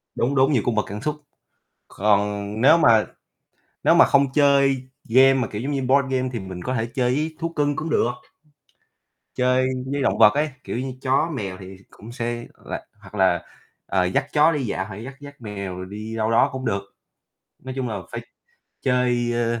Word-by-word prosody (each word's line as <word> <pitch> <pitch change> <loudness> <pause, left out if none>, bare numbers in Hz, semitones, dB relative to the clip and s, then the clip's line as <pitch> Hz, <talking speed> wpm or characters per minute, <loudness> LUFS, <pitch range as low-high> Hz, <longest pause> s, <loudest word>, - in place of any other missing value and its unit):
Đúng, 135 +4 0
đúng, 135 +2 +4
nhiều 120 - +3
cung 120 - 0
bậc 105 - +1
cảm 105 +2 -6
xúc. 150 +2 -2 0.7
Còn 100 0 +1 0.2
nếu 155 +6 +6
mà 110 -7 +5 0.8
nếu - - +5
mà - - +8
không 140 -1 +3
chơi 140 -3 +3 0.2
game 130 +3 +6
mà 125 -3 0
kiểu 105 +1 -5
giống 140 - -3
như 140 -2 -1
board 135 +1 +2
game 130 0 0
thì 115 - -2
mình 95 -2 -8
có 130 - -2
thể 110 -1 0
chơi 125 0 +1
với 155 +2 -2
thú 165 0 -2
cưng 145 -3 0
cũng 160 +3 -4
được. 120 - +2 1.2
Chơi 125 0 +2 0.2
với 140 0 -1
động - - +1
vật 105 - +7
ấy, 150 +2 0
kiểu - - -4
như 130 +1 -4
chó 135 +5 +1
mèo 95 -7 -4
thì 95 0 -10
cũng 115 +3 -13
sẽ, 120 -1 -4
ờ, - - -19
là - - -4 0.2
hoặc 100 +1 -13
là, 95 -3 +3 0.4
ờ, 95 -2 +1
dắt 135 +10 0
chó 155 +2 +5
đi 145 -5 -2
dạo 95 -2 -2
hoặc 105 - -8
là 105 - -8
dắt 135 +3 -8
dắt 145 -2 -12
mèo 100 -4 -6
rồi 95 - -6
đi 110 +2 -7
đâu 110 0 0
đó 115 - +4
cũng 130 -1 -5
được. 100 0 0 0.8
Nói 130 0 -6
chung 130 -2 -2
là 105 -3 -3
phải - - -5 0.6
chơi, 125 -2 +1
ơ 115 0 0
125 Hz, 210 wpm, -23 LUFS, 105-135 Hz, 1.2 s, mà